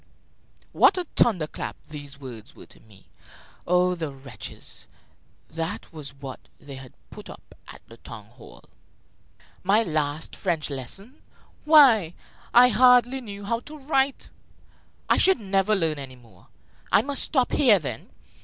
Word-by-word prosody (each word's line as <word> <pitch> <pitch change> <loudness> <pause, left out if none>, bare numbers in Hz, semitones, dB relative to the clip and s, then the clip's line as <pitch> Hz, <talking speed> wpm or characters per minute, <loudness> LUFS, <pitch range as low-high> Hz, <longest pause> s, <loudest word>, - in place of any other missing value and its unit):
What - - +4
a 365 - -1
thunder 185 -10 +3
clap - - -7
these 145 -2 -10
words 120 -5 -10
were - - -13
to - - -17
me! 105 -3 -22 0.6
Oh, 180 +1 +3
the 165 -4 -5
wretches; 135 0 -11 0.6
that 165 +4 -6
was 150 -4 -8
what 135 -2 -9 0.2
they 145 -3 -11
had 130 -1 -11 0.2
put - - -11
up - - -13
at - - -13
the 115 - -15
town 115 -3 -11
hall! 115 +3 -16 1.0
My 205 +4 +3
last 155 -3 -3
French 165 -6 -2
lesson! 195 - -6 0.4
Why, 250 - +6 0.4
I 245 +1 +7
hardly 250 +2 +4
knew 205 -3 -9
how 230 +3 -1
to 300 +5 -11
write! 270 -1 -1 0.8
I - - +3
should 380 -7 +4
never 195 0 +1
learn 160 -6 0
any 135 -2 -9
more! 115 -8 -21 0.4
I 200 - +4
must 285 0 0
stop 260 -5 +1
there, 245 -8 +4
then! 135 -10 -6
175 Hz, 145 wpm, -24 LUFS, -, 1.0 s, I